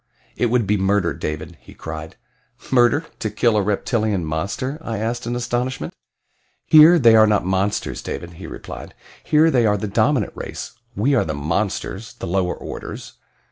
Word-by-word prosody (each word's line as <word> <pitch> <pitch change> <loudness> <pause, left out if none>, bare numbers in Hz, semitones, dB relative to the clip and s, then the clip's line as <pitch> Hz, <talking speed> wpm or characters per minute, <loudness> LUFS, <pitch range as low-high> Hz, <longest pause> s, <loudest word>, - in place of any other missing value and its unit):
"It 120 - +1
would 120 -1 +1
be 105 +2 +1
murder, 95 -2 +1
David," 75 -1 -5
he - - -15
cried. 80 0 -7 0.6
"Murder 130 +5 +4
to 110 - -2
kill 110 +2 +2
a 105 - +3
reptilian 105 -2 0
monster?" 100 - -3
I 115 -7 -4
asked 115 +3 -3
in 120 - -2
astonishment. 120 +1 -2 0.7
"Here 155 +3 +8
they 115 -7 +6
are 110 0 +7
not 105 -4 +2
monsters, 95 +2 -1
David," 85 0 -6
he 90 +3 -9
replied. - - -9 0.3
"Here 155 +2 +4
they 120 -5 +3
are 105 0 +2
the 105 - -3
dominant 110 +4 +1
race - - -6 0.2
we 125 +9 +1
are 135 - +3
the 75 -2 -3
'monsters' 95 +7 -3
the - - -6
lower 90 0 0
orders. - - -8
110 Hz, 170 wpm, -21 LUFS, 95-120 Hz, 0.7 s, Here